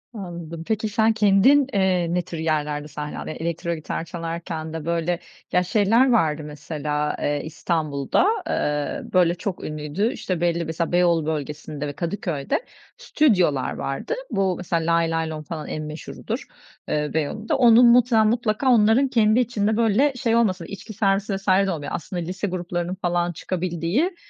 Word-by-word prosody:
Anladım. 170 Hz, -4 st, -7 dB
Peki 220 Hz, 0 st, -1 dB
sen 220 Hz, +2 st, +3 dB
kendin, 220 Hz, +7 st, +5 dB
eee, 185 Hz, -3 st, +2 dB
ne 180 Hz, -, +2 dB
tür 170 Hz, -1 st, -8 dB
yerlerde 150 Hz, -2 st, -1 dB
sahne 150 Hz, 0 st, -6 dB
aldın? -, -, -6 dB
Ya, -, -, -5 dB
elektro 170 Hz, +1 st, -3 dB
gitar 160 Hz, +1 st, -4 dB
çalarken 165 Hz, -1 st, -5 dB
de 160 Hz, -2 st, -5 dB
böyle, 170 Hz, +1 st, 0 dB, 0.3 s
ya 180 Hz, -, +3 dB
şeyler 225 Hz, +6 st, +3 dB
vardı 155 Hz, -9 st, +2 dB
mesela, 150 Hz, 0 st, -3 dB
eee, 145 Hz, 0 st, -1 dB
İstanbul'da, 155 Hz, -, 0 dB, 0.2 s
eee, 150 Hz, 0 st, -2 dB
böyle 175 Hz, -2 st, +4 dB
çok 180 Hz, +1 st, -5 dB
ünlüydü, 155 Hz, -, -2 dB
işte 180 Hz, -9 st, -3 dB
belli 170 Hz, -1 st, +1 dB
mesela 160 Hz, +1 st, -2 dB
Beyoğlu 175 Hz, -3 st, +3 dB
bölgesinde 150 Hz, -1 st, -4 dB
ve 145 Hz, -, -5 dB
Kadıköy'de 170 Hz, -, -2 dB, 0.3 s
stüdyolar 185 Hz, -, +2 dB
vardı. 135 Hz, -, -3 dB, 0.2 s
Bu 190 Hz, -2 st, +1 dB
mesela 170 Hz, -2 st, 0 dB
Laylaylom 165 Hz, -2 st, -1 dB
falan 155 Hz, 0 st, -6 dB
en 155 Hz, -, -4 dB
meşhurudur, 155 Hz, 0 st, -6 dB, 0.4 s
eee, 150 Hz, -1 st, -1 dB
Beyoğlu'nda. 215 Hz, -, -1 dB
Onun 240 Hz, -1 st, +7 dB
muhtemelen, 235 Hz, -2 st, +5 dB
mutlaka 230 Hz, +2 st, +1 dB
onların 225 Hz, +3 st, +4 dB
kendi 225 Hz, -2 st, +3 dB
içinde 220 Hz, -3 st, 0 dB
böyle 235 Hz, +5 st, +3 dB
şey 235 Hz, -2 st, 0 dB
olmasa, 190 Hz, -7 st, +1 dB
içki 200 Hz, +4 st, -9 dB
servisi 195 Hz, -1 st, +1 dB
vs. 195 Hz, +1 st, -8 dB, 0.2 s
de -, -, 0 dB
olmuyor, 150 Hz, -4 st, -5 dB
aslında 175 Hz, +2 st, -5 dB
lise 185 Hz, +4 st, -3 dB
gruplarının 175 Hz, -1 st, -3 dB
falan 175 Hz, 0 st, 0 dB
çıkabildiği, 180 Hz, -, -1 dB
175 Hz, 155 wpm, -23 LUFS, 160-215 Hz, 0.4 s, Onun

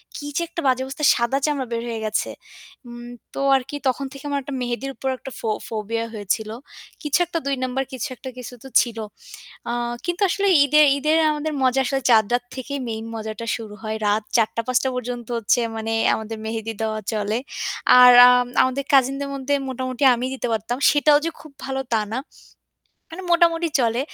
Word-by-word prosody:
কি 290 Hz, -, -6 dB
যে -, -, +1 dB
একটা 335 Hz, -, -5 dB
বাজে 260 Hz, 0 st, +2 dB
অবস্থা! 270 Hz, +3 st, -7 dB
সাদা 235 Hz, +3 st, 0 dB
চামড়া 285 Hz, -4 st, -1 dB
বের 230 Hz, 0 st, -1 dB
হয়ে 225 Hz, -1 st, -4 dB
গেছে। 215 Hz, -, -1 dB, 0.6 s
উম 240 Hz, 0 st, -9 dB, 0.3 s
তো -, -, -5 dB, 0.2 s
আর 265 Hz, -, +2 dB
কি 290 Hz, -, -5 dB
তখন 275 Hz, +2 st, 0 dB
থেকে 275 Hz, 0 st, -11 dB
আমার 285 Hz, 0 st, 0 dB
একটা 280 Hz, -, -7 dB
মেহেদীর 245 Hz, +3 st, -3 dB
উপর 265 Hz, -, -3 dB
একটা 265 Hz, -, -9 dB
ফো-ফোবিয়া 225 Hz, +1 st, -3 dB
হয়েছিল। 215 Hz, +1 st, -2 dB, 0.5 s
কিছু 295 Hz, +3 st, +1 dB
একটা 335 Hz, 0 st, -3 dB
২ 280 Hz, -1 st, 0 dB
নম্বর 260 Hz, +1 st, -1 dB
কিছু 260 Hz, +2 st, -3 dB
একটা, 260 Hz, +2 st, -8 dB
কিছু 250 Hz, 0 st, -8 dB
তো -, -, -9 dB
ছিল। 235 Hz, -2 st, -4 dB, 0.7 s
আ -, -, 0 dB, 0.3 s
কিন্তু 350 Hz, +3 st, -3 dB
আসলে 400 Hz, +2 st, 0 dB, 0.2 s
ঈদে 300 Hz, +2 st, +4 dB, 0.2 s
ঈদে 300 Hz, +2 st, 0 dB, 0.2 s
আমাদের 300 Hz, +1 st, -3 dB
মজা 260 Hz, +1 st, +3 dB
আসলে 270 Hz, +1 st, -1 dB
চাদ 220 Hz, -3 st, +6 dB
রাত 245 Hz, 0 st, +1 dB
থেকেই 275 Hz, +2 st, -5 dB
মেইন 220 Hz, 0 st, -5 dB
মজাটা 220 Hz, +1 st, -6 dB
শুরু 215 Hz, -2 st, -9 dB
হয়। 220 Hz, 0 st, -3 dB
রাত 210 Hz, +1 st, +1 dB
৪-৫ 235 Hz, +3 st, +1 dB
পর্যন্ত 245 Hz, -1 st, -5 dB
হচ্ছে 230 Hz, +2 st, +2 dB, 0.2 s
মানে 225 Hz, 0 st, -3 dB, 0.2 s
আমাদের 220 Hz, 0 st, -6 dB
মেহেদী 225 Hz, 0 st, -4 dB
দেওয়া 215 Hz, -1 st, -1 dB
চলে। 210 Hz, +1 st, -1 dB, 0.6 s
আর 250 Hz, 0 st, +10 dB, 0.2 s
আম 250 Hz, 0 st, +4 dB, 0.2 s
আমাদের 260 Hz, +2 st, -1 dB
কাজিনদের 275 Hz, +1 st, +3 dB
মধ্যে 275 Hz, +1 st, -2 dB, 0.2 s
মোটামুটি 255 Hz, +1 st, -4 dB
আমি 245 Hz, +2 st, -3 dB
দিতে 255 Hz, -, -3 dB
পারতাম। 225 Hz, +3 st, -2 dB
সেটাও 290 Hz, 0 st, +4 dB
যে -, -, +1 dB
খুব 310 Hz, -, -13 dB
ভালো 265 Hz, 0 st, -2 dB
তা 220 Hz, -, +3 dB
না। 255 Hz, -, -1 dB, 0.9 s
মানে 370 Hz, +3 st, -8 dB
মোটামুটি 340 Hz, -1 st, +3 dB
চলে। 235 Hz, +1 st, +1 dB
250 Hz, 185 wpm, -22 LUFS, 225-275 Hz, 0.9 s, আর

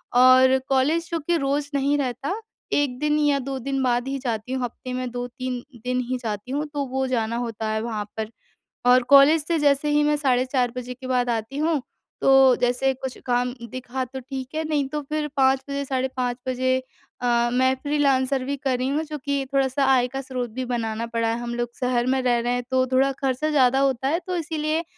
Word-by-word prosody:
और 255 Hz, +1 st, +7 dB
कॉलेज 295 Hz, +5 st, +2 dB
क्योंकि 335 Hz, 0 st, 0 dB
रोज़ 280 Hz, 0 st, -1 dB
नहीं 280 Hz, +1 st, +2 dB
रहता 275 Hz, -, -2 dB, 0.3 s
1 280 Hz, -4 st, +1 dB
दिन 300 Hz, 0 st, +1 dB
या 290 Hz, -2 st, +3 dB
2 270 Hz, 0 st, -4 dB
दिन 270 Hz, +2 st, -2 dB
बाद 245 Hz, 0 st, +1 dB
ही 275 Hz, +1 st, -2 dB
जाती। 240 Hz, -1 st, -3 dB
हफ्ते 250 Hz, +1 st, -5 dB
में 255 Hz, -1 st, -3 dB
2-3 245 Hz, 0 st, -4 dB, 0.2 s
दिन 250 Hz, 0 st, 0 dB
ही 255 Hz, -, 0 dB
जाती 215 Hz, +2 st, -4 dB
हूँ 290 Hz, +3 st, -1 dB
तो 285 Hz, -1 st, -1 dB
वो 265 Hz, +1 st, -1 dB
जाना 230 Hz, -3 st, -1 dB
होता 230 Hz, -2 st, -3 dB
है 220 Hz, 0 st, -1 dB
वहाँ 220 Hz, -3 st, -3 dB
पर। 220 Hz, -1 st, -3 dB, 0.6 s
और 255 Hz, 0 st, +6 dB
कॉलेज 290 Hz, +3 st, +7 dB
से 335 Hz, -1 st, +1 dB
जैसे 290 Hz, 0 st, +2 dB
ही 295 Hz, 0 st, +3 dB
मैं 295 Hz, 0 st, +2 dB
साढ़े 255 Hz, -4 st, +2 dB
4 255 Hz, -2 st, +1 dB
बजे 250 Hz, 0 st, -5 dB
के 255 Hz, +1 st, -10 dB
बाद 250 Hz, -1 st, +1 dB
आती 230 Hz, +4 st, -3 dB
हूँ 310 Hz, -2 st, +1 dB, 0.4 s
तो, 270 Hz, -2 st, +6 dB
जैसे 250 Hz, +2 st, +2 dB
कुछ 260 Hz, 0 st, -6 dB
काम 245 Hz, 0 st, +1 dB, 0.2 s
दिखा 255 Hz, +1 st, -4 dB
तो 265 Hz, +1 st, -8 dB
ठीक 260 Hz, +2 st, -7 dB
है 315 Hz, +1 st, -1 dB
नहीं 290 Hz, -3 st, 0 dB
तो 300 Hz, +2 st, -3 dB
फिर 300 Hz, +1 st, -3 dB
5:00 265 Hz, 0 st, +4 dB
बजे 280 Hz, 0 st, -2 dB
साढ़े 260 Hz, -1 st, -1 dB
5 245 Hz, -1 st, -1 dB
बजे 255 Hz, 0 st, +1 dB, 0.5 s
अ, 240 Hz, -1 st, +2 dB
मैं 260 Hz, +1 st, +3 dB
फ्रीलांसर 275 Hz, -3 st, +1 dB
भी 280 Hz, +2 st, -2 dB
कर 270 Hz, -2 st, -1 dB
रही 255 Hz, +1 st, -1 dB
हूँ 295 Hz, +3 st, 0 dB
चूँकि 285 Hz, -2 st, -3 dB
थोड़ा-सा 270 Hz, 0 st, +2 dB
आय 250 Hz, -1 st, +3 dB
का 270 Hz, +2 st, -4 dB
स्रोत 255 Hz, -2 st, -4 dB
भी 255 Hz, +4 st, -4 dB
बनाना 230 Hz, -2 st, -2 dB
पड़ा। 230 Hz, -1 st, -1 dB
हम 240 Hz, 0 st, -4 dB
लोग 240 Hz, 0 st, -2 dB
शहर 250 Hz, -1 st, +1 dB
में 265 Hz, +1 st, +2 dB
रह 245 Hz, -1 st, +2 dB
रहे 245 Hz, +1 st, 0 dB
तो 255 Hz, +1 st, +1 dB
थोड़ा 265 Hz, +1 st, +4 dB
खर्चा 270 Hz, +2 st, 0 dB
ज़्यादा 265 Hz, -3 st, +4 dB
होता 270 Hz, -1 st, +1 dB
है 325 Hz, +4 st, +1 dB
तो 365 Hz, -1 st, -2 dB
इसीलिए 315 Hz, 0 st, -1 dB
260 Hz, 205 wpm, -24 LUFS, 245-280 Hz, 0.6 s, और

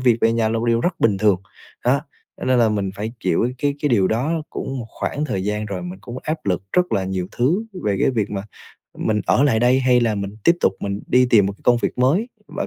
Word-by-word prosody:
việc 125 Hz, -3 st, +4 dB
về 115 Hz, -, +3 dB
nhà 115 Hz, -1 st, +1 dB
là 115 Hz, -, 0 dB
một 115 Hz, -, -2 dB
điều 115 Hz, 0 st, +2 dB
rất 175 Hz, +3 st, -1 dB
bình 100 Hz, -4 st, +3 dB
thường, 100 Hz, -3 st, +2 dB, 0.4 s
đó. 130 Hz, +3 st, +3 dB, 0.4 s
Cho -, -, -4 dB
nên 130 Hz, -1 st, +3 dB
là 115 Hz, -2 st, +4 dB
mình 100 Hz, -2 st, -1 dB
phải 110 Hz, +3 st, -4 dB
chịu 120 Hz, -, +1 dB
cái 145 Hz, 0 st, 0 dB
cái 145 Hz, -, +2 dB
điều 100 Hz, -6 st, +3 dB
đó 150 Hz, +9 st, 0 dB
cũng 135 Hz, -1 st, -4 dB
một 115 Hz, -, -6 dB
khoảng 150 Hz, +6 st, -3 dB
thời 95 Hz, -10 st, -2 dB
gian 105 Hz, +1 st, -2 dB
rồi, 95 Hz, -3 st, -4 dB
mình 90 Hz, +2 st, -7 dB
cũng 120 Hz, +4 st, -7 dB
áp 155 Hz, -5 st, -4 dB
lực 90 Hz, -1 st, 0 dB
rất 180 Hz, -5 st, +2 dB
là 95 Hz, -3 st, +1 dB
nhiều 95 Hz, -1 st, -2 dB
thứ 155 Hz, -, +1 dB, 0.2 s
về 100 Hz, -2 st, +1 dB
cái -, -, +3 dB
việc 110 Hz, -5 st, -1 dB
mà 100 Hz, -1 st, -3 dB, 0.6 s
mình 105 Hz, -1 st, 0 dB
ở 130 Hz, -, +3 dB
lại 115 Hz, -6 st, +2 dB
đây 125 Hz, +2 st, +4 dB
hay 125 Hz, -1 st, +4 dB
là 115 Hz, -2 st, +1 dB
mình 100 Hz, +1 st, -5 dB
tiếp 170 Hz, +1 st, +5 dB
tục -, -, +3 dB
mình 100 Hz, 0 st, -3 dB
đi 125 Hz, 0 st, +4 dB
tìm 105 Hz, -5 st, +5 dB
một 100 Hz, -, -2 dB
cái 100 Hz, -, -19 dB
công 120 Hz, -, +5 dB
việc -, -, -2 dB
mới, 165 Hz, -, +2 dB, 0.2 s
và -, -, -4 dB
115 Hz, 265 wpm, -21 LUFS, 100-130 Hz, 0.6 s, tiếp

